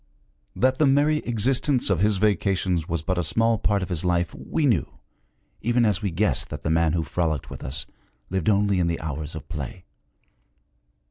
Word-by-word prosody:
That 130 Hz, +1 st, +2 dB
the 150 Hz, -, +4 dB
merry 145 Hz, +3 st, +3 dB
existence 125 Hz, +1 st, +2 dB
of 95 Hz, -, +2 dB
his 105 Hz, +1 st, +3 dB
vacations 95 Hz, -4 st, 0 dB
was 85 Hz, -2 st, -2 dB
but 90 Hz, +2 st, -1 dB
a -, -, 0 dB
small 115 Hz, +7 st, +1 dB
part 100 Hz, -1 st, +1 dB
of 90 Hz, -, -6 dB
his 85 Hz, -3 st, -2 dB
life, 90 Hz, -1 st, 0 dB
we 155 Hz, -, -2 dB
knew, 110 Hz, -, 0 dB, 0.6 s
even 120 Hz, +1 st, +2 dB
as 105 Hz, -2 st, +1 dB
we 100 Hz, -, -1 dB
guessed 95 Hz, +5 st, 0 dB
that 75 Hz, -1 st, -7 dB
the 80 Hz, -, 0 dB
man 80 Hz, -1 st, +2 dB
who 85 Hz, -2 st, 0 dB
frolicked 80 Hz, -4 st, -2 dB
with -, -, -8 dB
us 70 Hz, +3 st, -2 dB, 0.5 s
lived 95 Hz, 0 st, 0 dB
only 100 Hz, -2 st, +2 dB
in 85 Hz, -, +1 dB
the 85 Hz, -1 st, -1 dB
hours 75 Hz, 0 st, -5 dB
of 75 Hz, -2 st, -8 dB
play. 80 Hz, +3 st, -6 dB
95 Hz, 190 wpm, -24 LUFS, 80-110 Hz, 0.6 s, the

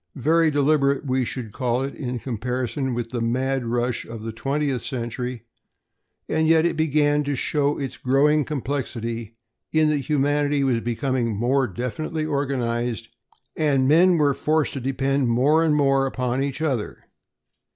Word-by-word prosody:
Very 160 Hz, +4 st, +3 dB
deliberate, 145 Hz, -1 st, +2 dB
we 130 Hz, -1 st, +1 dB
should 115 Hz, -3 st, -5 dB
call 125 Hz, -1 st, 0 dB
it 140 Hz, -, -4 dB
in 125 Hz, -3 st, -4 dB
comparison 125 Hz, +2 st, -3 dB
with 120 Hz, -1 st, -4 dB
the 120 Hz, -2 st, -3 dB
mad 130 Hz, +2 st, -1 dB
rush 120 Hz, +1 st, -1 dB
of 115 Hz, -1 st, -9 dB
the 115 Hz, -, -4 dB
twentieth 135 Hz, +2 st, -1 dB
century, 125 Hz, -1 st, -4 dB, 0.8 s
and 160 Hz, 0 st, +1 dB
yet 160 Hz, 0 st, +4 dB
it 170 Hz, -, +1 dB
began 150 Hz, -1 st, +2 dB
to 145 Hz, 0 st, -2 dB
show 145 Hz, +2 st, 0 dB
its 135 Hz, -2 st, -5 dB
growing 145 Hz, +4 st, +3 dB
complexity 115 Hz, -6 st, -4 dB, 0.3 s
in 155 Hz, -1 st, +3 dB
that 150 Hz, -1 st, +1 dB
humanity 145 Hz, +1 st, +1 dB
was 125 Hz, -4 st, +2 dB
becoming 120 Hz, -1 st, -1 dB
more 130 Hz, +5 st, +1 dB
definitely 125 Hz, -, -3 dB
organized 125 Hz, -6 st, -2 dB, 0.4 s
and 140 Hz, -4 st, +2 dB
men 170 Hz, +4 st, +5 dB
were 145 Hz, -2 st, +3 dB
forced 155 Hz, +2 st, 0 dB
to 135 Hz, -, -4 dB
depend 135 Hz, +1 st, 0 dB
more 140 Hz, +7 st, +3 dB
and 155 Hz, -2 st, +2 dB
more 135 Hz, -2 st, +3 dB
upon 125 Hz, 0 st, -2 dB
each 140 Hz, +3 st, -2 dB
other. 130 Hz, -9 st, -2 dB
135 Hz, 150 wpm, -23 LUFS, 120-145 Hz, 0.8 s, men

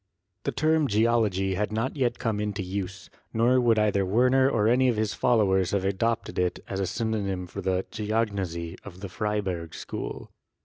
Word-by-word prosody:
The -, -, +1 dB
term 155 Hz, -1 st, +2 dB
geology 105 Hz, -4 st, +2 dB
had 105 Hz, +3 st, -1 dB
not 115 Hz, +6 st, -1 dB
yet 130 Hz, -4 st, 0 dB
come 110 Hz, -3 st, -1 dB
into 105 Hz, -1 st, -2 dB
use, 95 Hz, +1 st, -5 dB, 0.2 s
nor 125 Hz, +3 st, +4 dB
would 115 Hz, -2 st, +3 dB
either 105 Hz, -2 st, +2 dB
Werner 125 Hz, +7 st, +4 dB
or 105 Hz, -5 st, +2 dB
any 125 Hz, +3 st, +4 dB
of 120 Hz, -, +2 dB
his 110 Hz, -1 st, 0 dB
followers 95 Hz, -6 st, +2 dB
have 95 Hz, -2 st, +1 dB
adopted 110 Hz, +3 st, -1 dB
it 90 Hz, -1 st, +1 dB
as 95 Hz, -, -3 dB
a 95 Hz, -, 0 dB
synonym 100 Hz, -4 st, -2 dB
for 95 Hz, +3 st, -7 dB
the 95 Hz, 0 st, 0 dB
"geognosy" 100 Hz, -6 st, -2 dB
of 95 Hz, -2 st, -11 dB
the 100 Hz, -, -5 dB
Freiberg 95 Hz, -5 st, -2 dB
school. -, -, -6 dB
105 Hz, 175 wpm, -27 LUFS, 95-115 Hz, 0.2 s, nor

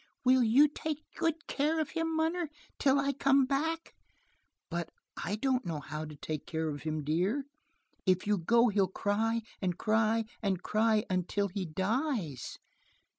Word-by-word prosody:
"Will 255 Hz, +1 st, +6 dB
you 245 Hz, +6 st, +6 dB
take 305 Hz, +1 st, -4 dB
good 325 Hz, 0 st, -1 dB
care 305 Hz, +3 st, 0 dB
of 310 Hz, -, -1 dB
him, 325 Hz, -1 st, -1 dB
munner? 325 Hz, +1 st, 0 dB, 0.3 s
Till 275 Hz, 0 st, +4 dB
I 280 Hz, 0 st, +1 dB
come 275 Hz, 0 st, +4 dB
back?" 320 Hz, +5 st, -1 dB, 0.7 s
"But 170 Hz, -1 st, -3 dB, 0.3 s
I 200 Hz, -, -1 dB
don't 255 Hz, +2 st, +1 dB
know 165 Hz, -4 st, -3 dB
how 155 Hz, +2 st, -5 dB
to 150 Hz, -1 st, -9 dB
take 150 Hz, +1 st, -5 dB
care 160 Hz, -1 st, -1 dB
of 145 Hz, -1 st, -5 dB
him, 155 Hz, -1 st, -2 dB
dear. 185 Hz, -, 0 dB, 0.6 s
If 185 Hz, 0 st, +3 dB
you 205 Hz, -1 st, +2 dB
go 235 Hz, +7 st, +4 dB
he'll 200 Hz, -2 st, +2 dB
cry 220 Hz, +4 st, 0 dB, 0.2 s
and 180 Hz, -3 st, -1 dB
cry 220 Hz, +1 st, +2 dB, 0.2 s
and 195 Hz, -4 st, -1 dB
cry 215 Hz, 0 st, +2 dB
until 185 Hz, +2 st, 0 dB
he 185 Hz, -1 st, -3 dB
dies." 190 Hz, -, -2 dB
220 Hz, 160 wpm, -31 LUFS, 180-275 Hz, 0.7 s, Will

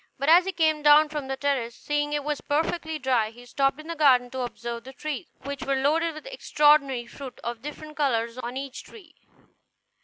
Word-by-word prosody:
But 280 Hz, +3 st, 0 dB
as 345 Hz, +3 st, +7 dB
he 385 Hz, -, -1 dB
came 315 Hz, -4 st, +1 dB
down 300 Hz, +1 st, +6 dB
from 295 Hz, -3 st, -4 dB
the 270 Hz, 0 st, -3 dB
terrace, 260 Hz, -5 st, -1 dB
seeing 295 Hz, 0 st, -2 dB
it 295 Hz, -1 st, -1 dB
was 295 Hz, 0 st, -2 dB
perfectly 320 Hz, +1 st, -1 dB
dry, 255 Hz, -6 st, +1 dB
he 240 Hz, +2 st, -15 dB
stopped 275 Hz, +3 st, 0 dB
in 310 Hz, -, -10 dB
the 335 Hz, -, -4 dB
garden 255 Hz, -5 st, +4 dB
to 260 Hz, -, -5 dB
observe 235 Hz, -1 st, -5 dB
the 265 Hz, +2 st, -11 dB
trees, 305 Hz, +3 st, -5 dB, 0.2 s
which 280 Hz, 0 st, -5 dB
were 275 Hz, -, 0 dB
loaded 310 Hz, +4 st, +1 dB
with 310 Hz, -, -10 dB
extraordinary 295 Hz, -, +3 dB
fruit, 265 Hz, +1 st, -10 dB
of 235 Hz, -1 st, -4 dB
different 305 Hz, +1 st, -9 dB
colors 235 Hz, -4 st, 0 dB
on 245 Hz, +1 st, -5 dB
each 275 Hz, -1 st, -6 dB
tree. 370 Hz, -8 st, -15 dB
280 Hz, 205 wpm, -26 LUFS, 255-305 Hz, 0.2 s, as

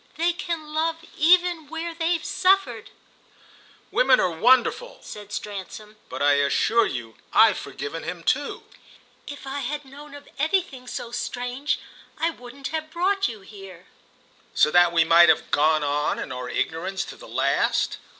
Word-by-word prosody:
They 340 Hz, +2 st, +1 dB
can 325 Hz, -3 st, -5 dB
love 325 Hz, +1 st, -1 dB
even 345 Hz, -1 st, +3 dB
where 325 Hz, +2 st, -5 dB
they've 330 Hz, 0 st, -1 dB
suffered." 385 Hz, +1 st, +1 dB, 1.0 s
"Women 255 Hz, 0 st, +4 dB
are 180 Hz, -, +1 dB
wonderful," 255 Hz, -, +2 dB
said 205 Hz, -1 st, -10 dB
Stransom. 210 Hz, +1 st, -7 dB
"But -, -, -4 dB
I 145 Hz, 0 st, +5 dB
assure 225 Hz, +10 st, +2 dB
you 115 Hz, -3 st, -6 dB
I've -, -, +5 dB
forgiven 165 Hz, +3 st, -6 dB
him 175 Hz, -2 st, -6 dB
too." 285 Hz, +8 st, -1 dB, 0.6 s
"If 285 Hz, -1 st, -8 dB
I 270 Hz, +1 st, -4 dB
had 290 Hz, +2 st, -4 dB
known 285 Hz, +2 st, -12 dB
of 285 Hz, -, -13 dB
anything 310 Hz, -5 st, -1 dB
so 235 Hz, -, -6 dB
strange 245 Hz, +3 st, -3 dB, 0.4 s
I 330 Hz, +2 st, 0 dB
wouldn't 255 Hz, 0 st, -9 dB
have 315 Hz, -1 st, -4 dB
brought 380 Hz, +4 st, +1 dB
you 220 Hz, -4 st, -8 dB
here." 195 Hz, -3 st, -13 dB, 0.7 s
"So 150 Hz, -, +4 dB
that 175 Hz, 0 st, +5 dB
we 165 Hz, -1 st, +4 dB
might 170 Hz, +1 st, +6 dB
have -, -, +2 dB
gone 155 Hz, +1 st, +3 dB
on 145 Hz, +1 st, 0 dB
in -, -, -6 dB
our 125 Hz, -1 st, -5 dB
ignorance 180 Hz, +9 st, -2 dB
to -, -, -9 dB
the -, -, -13 dB
last?" -, -, 0 dB
255 Hz, 155 wpm, -24 LUFS, -, 1.0 s, might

